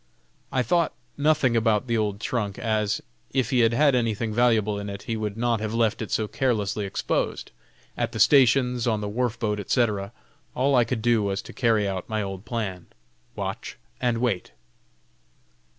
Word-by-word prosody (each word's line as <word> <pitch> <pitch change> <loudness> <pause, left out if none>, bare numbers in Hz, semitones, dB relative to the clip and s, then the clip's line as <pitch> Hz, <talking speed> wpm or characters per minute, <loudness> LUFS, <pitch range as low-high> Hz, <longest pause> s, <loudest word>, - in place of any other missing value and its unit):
I 130 - +1
thought 170 +6 +1 0.2
nothing 145 -4 +2
about 110 -1 +2
the 115 -2 0
old 105 -2 -1
trunk, 105 -3 -2
as, 110 -2 -1 0.3
if 130 -1 +1
he 130 - +3
had 115 -1 +5
had 145 +1 +4
anything 115 -2 0
valuable 110 -3 +2
in 100 0 -5
it, 100 0 -7
he 115 - -3
would 105 -1 -3
not 120 -1 +1
have 110 +1 -3
left 115 -1 +1
it 110 - -4
so 110 - 0
carelessly 105 -5 -1
exposed, - - -2 0.4
at - - -1
the - - -5
stations, 125 -3 +4
on 110 -2 +1
the 105 - -3
wharf 120 +2 -1
boat, 105 -3 -1
etc. 105 -2 0 0.4
All 135 +3 +2
I 125 -3 +5
could 115 -1 -3
do 120 -2 +3
was 100 -1 -2
to - - -11
carry 110 -5 +2
out 95 -2 -4
my 110 -1 -1
old 95 +1 -6
plan: 105 -6 -4 0.5
"Watch - - -5 0.2
and 120 -3 +1
wait." 115 -6 -1
115 Hz, 180 wpm, -25 LUFS, 105-125 Hz, 0.5 s, had